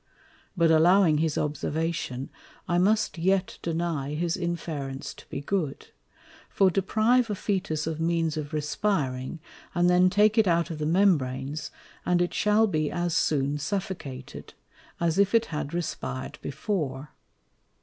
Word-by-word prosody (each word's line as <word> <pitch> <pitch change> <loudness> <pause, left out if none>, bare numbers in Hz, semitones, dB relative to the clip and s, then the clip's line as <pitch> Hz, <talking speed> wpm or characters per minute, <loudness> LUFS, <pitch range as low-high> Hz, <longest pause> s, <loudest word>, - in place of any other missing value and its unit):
But 165 -1 +4
allowing 165 0 +5
his 160 -1 0
Observation, 150 -3 -2 0.4
I 175 0 +2
must 210 -1 +2
yet 190 +2 +1
deny 160 -4 -2
his 170 +1 0
Inference 155 -6 -4
to - - -16
be 140 - -4
good: 155 -2 -3 0.6
For 195 -2 +3
deprive 220 +6 +2
a 210 - -1
Fœtus 185 -7 -2
of 160 -1 -3
means 165 -1 +1
of 150 -1 -4
respiring, 150 -3 -1 0.4
and 175 +1 +4
then 180 +1 +5
take 210 +4 +4
it 215 - +4
out 170 -1 +2
of 155 - -5
the 150 - -1
Membranes, 150 -5 +1 0.3
and 180 0 +2
it 175 0 0
shall 210 +1 +3
be 155 -7 0
as 175 -1 -1
soon 145 -2 +1
suffocated, 145 -6 -5 0.4
as 170 +1 +1
if 200 +2 +3
it 230 0 +4
had 150 -1 -3
respired 150 -6 -4
before. 145 -5 -3
165 Hz, 140 wpm, -27 LUFS, 150-190 Hz, 0.6 s, allowing